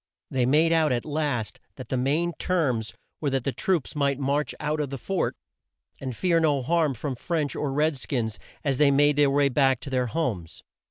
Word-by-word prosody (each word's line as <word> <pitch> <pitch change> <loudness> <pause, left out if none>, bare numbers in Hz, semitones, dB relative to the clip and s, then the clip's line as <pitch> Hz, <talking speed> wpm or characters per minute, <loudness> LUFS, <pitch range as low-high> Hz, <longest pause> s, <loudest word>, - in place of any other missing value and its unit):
They 125 -2 +1
made 160 +5 +4
out 160 -3 +3
at 120 -1 -1
last 145 -8 -2 0.2
that 130 - -9
the - - 0
main 150 +7 +1
terms 130 -12 0 0.2
were 145 - 0
that 135 -2 -1
the 135 - 0
troops 170 0 -1
might 140 -2 +1
march 140 +2 -1
out 155 +1 -1
of 145 -2 -1
the 135 - -5
fort, 190 +9 -1 0.6
and 130 -3 -5
fear 175 -3 +2
no 145 -5 +2
harm 160 -1 +1
from 135 +4 -3
French 150 +3 -2
or 145 - -2
red 150 +1 +1
skins 115 -4 -3 0.2
as 135 -3 0
they 150 -2 +6
made 145 +1 +4
their 145 -1 +5
way 140 0 +3
back 135 -1 +2
to 140 - -7
their 125 -1 +1
homes. 110 - -3
140 Hz, 205 wpm, -26 LUFS, 130-155 Hz, 0.6 s, they